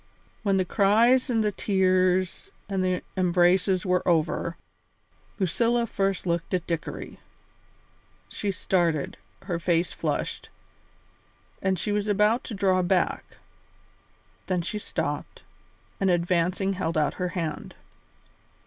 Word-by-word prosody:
When 200 Hz, -2 st, +2 dB
the 185 Hz, -, +1 dB
cries 230 Hz, +8 st, +4 dB
and 225 Hz, -3 st, +2 dB
the 210 Hz, -, +1 dB
tears 185 Hz, -, +1 dB, 0.2 s
and 195 Hz, -2 st, -1 dB
the 185 Hz, -1 st, 0 dB
embraces 185 Hz, +1 st, +3 dB
were 180 Hz, -1 st, +2 dB
over, 170 Hz, 0 st, +1 dB, 0.8 s
Lucilla 235 Hz, +5 st, +1 dB
first 195 Hz, -3 st, -1 dB
looked 170 Hz, +1 st, -1 dB
at 180 Hz, -, -2 dB
Dickory. 165 Hz, -2 st, -5 dB, 1.1 s
She 205 Hz, -, -4 dB
started, 175 Hz, -5 st, 0 dB, 0.3 s
her 175 Hz, -3 st, -3 dB
face 170 Hz, 0 st, +1 dB
flushed, -, -, -3 dB, 1.1 s
and 190 Hz, -1 st, +1 dB
she 190 Hz, +6 st, -2 dB
was 205 Hz, 0 st, 0 dB
about 210 Hz, +3 st, +2 dB
to 225 Hz, -, -5 dB
draw 190 Hz, -2 st, +2 dB
back; 180 Hz, 0 st, 0 dB, 1.1 s
then 180 Hz, -2 st, 0 dB
she 210 Hz, +5 st, -3 dB
stopped, -, -, -4 dB, 0.6 s
and 195 Hz, -, +2 dB
advancing 180 Hz, +2 st, +1 dB
held 165 Hz, -3 st, -2 dB
out 150 Hz, -2 st, +2 dB
her 180 Hz, -, +1 dB
hand. 160 Hz, -3 st, -4 dB
185 Hz, 120 wpm, -26 LUFS, 175-200 Hz, 1.1 s, cries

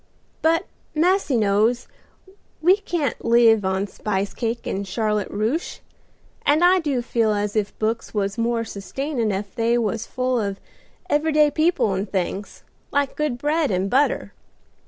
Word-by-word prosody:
But 330 Hz, +3 st, +2 dB, 0.3 s
massy 345 Hz, -4 st, +2 dB
knows, 220 Hz, +4 st, +2 dB, 0.7 s
we 360 Hz, +5 st, +5 dB
can't 340 Hz, -, -2 dB
live 230 Hz, -2 st, +5 dB
on 190 Hz, +1 st, 0 dB
spice 200 Hz, 0 st, -3 dB
cake 235 Hz, 0 st, -3 dB
and 195 Hz, +1 st, -3 dB
Charlotte 210 Hz, 0 st, -1 dB
Ruche, 225 Hz, -, -2 dB, 0.6 s
and 300 Hz, +4 st, +3 dB
I 365 Hz, +1 st, +6 dB
do 280 Hz, -7 st, -1 dB
feel 225 Hz, -3 st, +1 dB
as 205 Hz, 0 st, -2 dB
if 210 Hz, -2 st, -1 dB
books 225 Hz, +1 st, -2 dB
was 200 Hz, -2 st, -1 dB
more 230 Hz, 0 st, 0 dB
sustainin' 230 Hz, +4 st, -3 dB
ef 195 Hz, 0 st, -4 dB
they 235 Hz, 0 st, +1 dB
was 225 Hz, -1 st, -1 dB
full 255 Hz, -2 st, 0 dB
of 200 Hz, -1 st, -3 dB, 0.5 s
every 310 Hz, -1 st, +1 dB
day 300 Hz, -1 st, +5 dB
people 315 Hz, -, +2 dB
and 190 Hz, +1 st, -3 dB
things, 195 Hz, +1 st, -3 dB, 0.3 s
like 285 Hz, -1 st, 0 dB
good 300 Hz, -5 st, -1 dB
bread 300 Hz, +2 st, +1 dB
and 190 Hz, +1 st, -1 dB
butter. 280 Hz, +3 st, +1 dB
230 Hz, 150 wpm, -22 LUFS, 205-295 Hz, 0.7 s, I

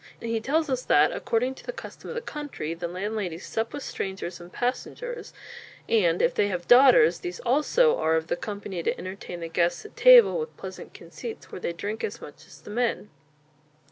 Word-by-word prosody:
He 230 Hz, -1 st, -2 dB
tells 310 Hz, +7 st, +1 dB
us 260 Hz, -2 st, -1 dB
that 150 Hz, +1 st, +5 dB
according 250 Hz, +3 st, -1 dB
to -, -, -14 dB
the -, -, -4 dB
custom -, -, -10 dB
of -, -, -5 dB
the 475 Hz, -, -3 dB
country 290 Hz, -, -5 dB
the 170 Hz, +1 st, -4 dB
landladies 185 Hz, -1 st, -4 dB
sup 225 Hz, +1 st, -2 dB
with 290 Hz, -1 st, -6 dB
strangers 190 Hz, -2 st, -5 dB
and 175 Hz, +1 st, -12 dB
passengers, 475 Hz, -, -4 dB, 0.6 s
and 180 Hz, -7 st, +2 dB
if -, -, +3 dB
they 205 Hz, -, +2 dB
have 180 Hz, -3 st, -4 dB
daughters, 275 Hz, -, +7 dB
these 360 Hz, -1 st, -6 dB
also 305 Hz, -, +3 dB
are 160 Hz, 0 st, +2 dB
of 160 Hz, 0 st, 0 dB
the -, -, -1 dB
company 200 Hz, -2 st, -5 dB
to -, -, -1 dB
entertain 185 Hz, -2 st, -7 dB
the 165 Hz, -, -4 dB
guests 170 Hz, -, 0 dB
at 425 Hz, -, -12 dB
table -, -, +7 dB
with 465 Hz, 0 st, -6 dB
pleasant -, -, -9 dB
conceits 455 Hz, -2 st, -9 dB
where -, -, -7 dB
they -, -, -1 dB
drink 205 Hz, +6 st, -5 dB
as 220 Hz, +3 st, -3 dB
much 145 Hz, -, -12 dB
as 145 Hz, -, -16 dB
the 205 Hz, -, -10 dB
men. 235 Hz, -1 st, -1 dB
220 Hz, 200 wpm, -26 LUFS, 175-290 Hz, 0.6 s, daughters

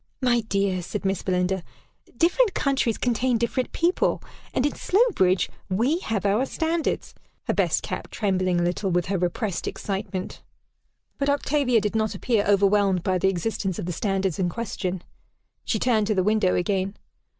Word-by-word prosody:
"My 245 Hz, -2 st, +3 dB
dear," 200 Hz, -3 st, 0 dB
said 195 Hz, +4 st, -5 dB
Miss 195 Hz, -1 st, 0 dB
Belinda, 185 Hz, 0 st, 0 dB, 0.6 s
"different 375 Hz, -, +3 dB
countries 270 Hz, -5 st, +1 dB
contain 245 Hz, 0 st, +1 dB
different 235 Hz, +2 st, -1 dB
people; 345 Hz, +2 st, +1 dB, 0.3 s
and 255 Hz, -, +1 dB
in 290 Hz, -, +1 dB
Slowbridge 360 Hz, -, +2 dB, 0.2 s
we 240 Hz, -, +1 dB
have 215 Hz, -, -2 dB
our 210 Hz, +7 st, +2 dB
standards," 325 Hz, +2 st, -1 dB, 0.3 s
her -, -, -1 dB
best -, -, +1 dB
cap -, -, -5 dB
trembling 185 Hz, -4 st, 0 dB
a -, -, +1 dB
little 180 Hz, +3 st, -1 dB
with 175 Hz, -1 st, +1 dB
her 195 Hz, 0 st, -1 dB
repressed 180 Hz, +2 st, -2 dB
excitement. 195 Hz, -2 st, -4 dB, 0.8 s
But 280 Hz, 0 st, +1 dB
Octavia 280 Hz, -4 st, +2 dB
did 210 Hz, +1 st, -2 dB
not 220 Hz, -2 st, 0 dB
appear 215 Hz, +1 st, +1 dB
overwhelmed 200 Hz, -2 st, +3 dB
by 185 Hz, -2 st, +1 dB
the 190 Hz, -, +3 dB
existence 190 Hz, 0 st, -2 dB
of -, -, -4 dB
the 180 Hz, -, -3 dB
standards 195 Hz, -1 st, -1 dB
in 180 Hz, -2 st, +1 dB
question. 190 Hz, -4 st, -4 dB, 0.6 s
She 220 Hz, -, 0 dB
turned 215 Hz, -2 st, +2 dB
to 215 Hz, -, +1 dB
the 185 Hz, -, +2 dB
window 210 Hz, -2 st, +2 dB
again. 190 Hz, +2 st, 0 dB
205 Hz, 160 wpm, -25 LUFS, 185-245 Hz, 0.8 s, My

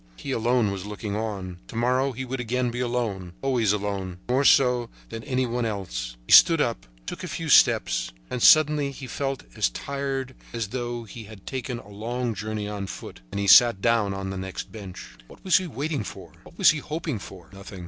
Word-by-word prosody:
He 135 Hz, -, -6 dB
alone 120 Hz, -3 st, +2 dB
was 100 Hz, 0 st, -5 dB
looking 105 Hz, 0 st, -5 dB
on. 100 Hz, -5 st, -4 dB
To -, -, -11 dB
morrow 130 Hz, +3 st, +1 dB
he 130 Hz, +1 st, -5 dB
would 130 Hz, +1 st, -4 dB
again 125 Hz, +1 st, -1 dB
be 120 Hz, -, -5 dB
alone, 115 Hz, -8 st, -2 dB
always 125 Hz, -6 st, +2 dB
alone, 100 Hz, -3 st, -3 dB
more 130 Hz, +3 st, +3 dB
so 125 Hz, -3 st, +4 dB, 0.2 s
than 115 Hz, -, -7 dB
any 130 Hz, -2 st, 0 dB
one 120 Hz, 0 st, -2 dB
else. -, -, -4 dB
He -, -, -6 dB
stood 165 Hz, -2 st, +8 dB
up, 115 Hz, -, -1 dB, 0.2 s
took -, -, -6 dB
a -, -, -4 dB
few -, -, -4 dB
steps, -, -, +4 dB, 0.2 s
and 125 Hz, -, -4 dB
suddenly 150 Hz, -1 st, +6 dB
he 135 Hz, -1 st, -8 dB
felt 135 Hz, +1 st, -3 dB
as -, -, +2 dB
tired 135 Hz, -, -4 dB, 0.2 s
as 115 Hz, -4 st, -3 dB
though 120 Hz, 0 st, -4 dB
he 110 Hz, +1 st, -10 dB
had 105 Hz, -2 st, -13 dB
taken 130 Hz, -2 st, -4 dB
a 110 Hz, -, -12 dB
long 115 Hz, +4 st, -3 dB
journey 105 Hz, +1 st, -4 dB
on 100 Hz, -2 st, -4 dB
foot, -, -, -9 dB
and 100 Hz, -, -4 dB
he 100 Hz, -, -1 dB
sat 115 Hz, +1 st, +7 dB
down 115 Hz, -2 st, +2 dB
on 95 Hz, 0 st, -4 dB
the 95 Hz, -, -4 dB
next 95 Hz, 0 st, -6 dB
bench. 100 Hz, -4 st, -10 dB
What -, -, -16 dB
was 185 Hz, -, +5 dB
he 185 Hz, -, -5 dB
waiting 145 Hz, -4 st, -3 dB
for? -, -, -9 dB
What -, -, -16 dB
was -, -, +7 dB
he 155 Hz, -, -3 dB
hoping 155 Hz, -4 st, -4 dB
for? 95 Hz, -2 st, -12 dB
Nothing. 100 Hz, 0 st, -10 dB
115 Hz, 210 wpm, -25 LUFS, 100-130 Hz, 0.2 s, stood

